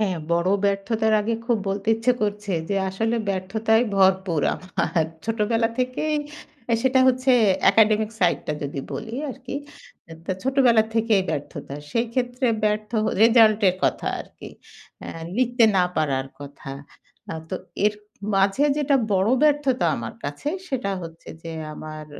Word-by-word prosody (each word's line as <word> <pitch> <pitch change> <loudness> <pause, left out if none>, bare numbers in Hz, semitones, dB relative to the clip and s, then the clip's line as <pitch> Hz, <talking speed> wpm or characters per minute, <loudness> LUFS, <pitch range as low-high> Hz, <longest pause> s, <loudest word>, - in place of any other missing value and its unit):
হ্যাঁ, 190 -5 0
বড় 170 +2 +2
ব্যর্থতার 200 +3 +1
আগে 230 +2 -1
খুব 240 -1 +2
বলতে 200 +1 -3
ইচ্ছে 225 +3 +2
করছে, 205 -1 -2 0.2
যে 200 - 0
আসলে 225 +5 -1
ব্যর্থতায় 220 +5 +1
ভরপুর 190 -4 +3
আমার। 175 -2 -1 0.2
ছোটবেলা 225 +1 +1
থেকেই 255 +5 0 0.5
অ্যা 235 - +1
সেটা 260 0 +3
হচ্ছে 255 +1 +2 0.4
একাডেমিক 215 0 +3
সাইডটা 170 -3 +1
যদি 140 -1 -4
বলি 225 +1 -5 0.2
আরকি, 260 +1 -8 0.6
আ - - -8
তো - - 0
ছোটবেলা 255 -4 +4
থেকেই 225 -3 +3
ব্যর্থতা। 145 -2 -5 0.2
সেইক্ষেত্রে 245 +2 -1 0.2
ব্যর্থ 210 0 0 0.3
রেজাল্টের 220 -4 +5
কথা - - 0
আরকি। - - -11 0.5
অ্যা - - -7 0.3
লিখতে 245 -1 +3
না 180 - +4
পারার 135 -4 0
কথা। 140 0 -9 0.6
আ - - -3 0.2
তো 185 - -1 0.3
এর 210 - +4 0.4
মাঝে 195 +8 +3
যেটা 290 -2 +2 0.2
বড় 195 +3 +2
ব্যর্থতা 285 -8 +2
আমার 115 -1 -6
কাছে, 145 - -4 0.2
সেটা 255 -8 -2
হচ্ছে 165 0 -10
যে 165 - -7 0.2
আমার 155 0 -8
215 Hz, 140 wpm, -23 LUFS, 185-240 Hz, 0.6 s, রেজাল্টের